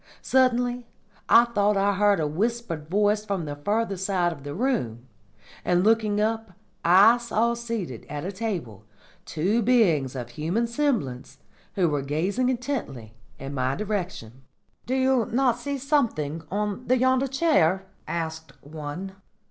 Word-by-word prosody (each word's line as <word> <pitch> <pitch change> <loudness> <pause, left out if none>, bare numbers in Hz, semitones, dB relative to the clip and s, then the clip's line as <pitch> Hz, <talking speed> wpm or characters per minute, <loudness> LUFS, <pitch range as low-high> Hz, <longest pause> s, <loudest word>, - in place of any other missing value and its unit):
Suddenly 245 -2 +2 0.4
I 235 - +7
thought 210 -3 +1
I 200 +1 +2
heard 200 -1 +3
a 155 - 0
whispered 170 -1 -2
voice 210 +2 +2
from 195 -5 -3
the 145 -1 -5
further 205 +6 -1
side 180 -2 0
of 145 - -13
the 145 0 -6
room, 170 - -1 0.6
and 180 0 +2
looking 215 -1 +2
up 220 -2 -1 0.3
I 200 +8 +6
saw 235 0 0
seated 230 - -5
at 150 +2 -5
a 190 - -3
table 180 - -4 0.4
two 195 +9 0
beings 180 - +2
of 120 -2 -5
human 165 - -1
semblance, 230 - -2 0.4
who 185 -3 +2
were 145 -3 0
gazing 180 - 0
intently 235 - -4 0.2
in 135 +1 -7
my 130 0 0
direction. 185 - -4 0.5
"'Do 255 - 0
you 260 -3 +2
not 245 0 +2
see 280 +3 -3
something 235 - 0
on 210 +4 -3
yonder 260 +1 +3
chair?' 245 - +2 0.2
asked 160 -1 -4
one. 155 +6 -6
200 Hz, 140 wpm, -25 LUFS, 155-235 Hz, 0.6 s, I